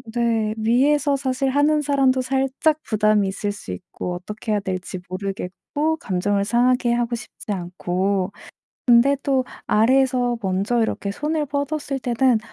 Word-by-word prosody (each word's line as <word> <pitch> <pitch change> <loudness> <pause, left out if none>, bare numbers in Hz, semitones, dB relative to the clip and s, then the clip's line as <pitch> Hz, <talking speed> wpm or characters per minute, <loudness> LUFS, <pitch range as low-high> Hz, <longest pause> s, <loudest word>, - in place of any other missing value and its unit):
네. 225 -2 +1
위에서 275 +6 +3
사실 265 0 -1
하는 290 +3 +3
사람도 270 -2 +2
살짝 270 +4 +1
부담이 215 -2 +2
있을 200 +2 -2
수 205 - -8
있고 90 - -6
어떻게 210 +5 -6
해야 210 - +2
될지 185 -1 -4
모르겠고 200 +11 -3
감정을 200 - 0
상하게 245 +2 +2
하고 240 0 0
싶지 220 -2 -8
않고 185 +1 -1 0.6
근데 245 +3 +5
또 265 -2 +1 0.2
아래에서 245 +1 +3
먼저 200 +4 0
이렇게 215 -2 -1
손을 300 +8 -1
뻗었을 285 0 -2
때는 250 -1 +2
235 Hz, 300 characters per minute, -22 LUFS, 200-270 Hz, 0.6 s, 근데